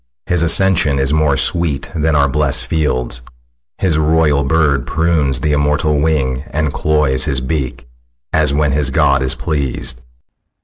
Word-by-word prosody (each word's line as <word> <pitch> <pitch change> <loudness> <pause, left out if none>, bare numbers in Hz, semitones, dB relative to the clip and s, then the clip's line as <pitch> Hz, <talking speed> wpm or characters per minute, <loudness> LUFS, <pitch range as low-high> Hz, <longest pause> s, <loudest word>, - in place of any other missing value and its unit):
His 90 -3 0
ascension 85 -4 +3
is 70 +1 +1
More 75 -3 +1
sweet 80 -2 +1
than 80 -2 0
our 70 -1 +3
blest 70 0 +2
fields. 65 -6 -2 0.6
His 80 -5 0
royal 75 -2 +1
bird 70 -2 0
Prunes 75 -5 0
the 75 - -1
immortal 75 +1 0
wing, 70 -4 -1
and 75 -1 -2
cloys 75 -2 +1
his 70 -4 0
beak, 65 -2 -5 0.5
As 75 -3 +2
when 75 0 0
his 70 0 +1
god 70 0 +1
is 65 -1 +1
pleas'd. 65 -4 -3
75 Hz, 145 wpm, -15 LUFS, 70-80 Hz, 0.6 s, ascension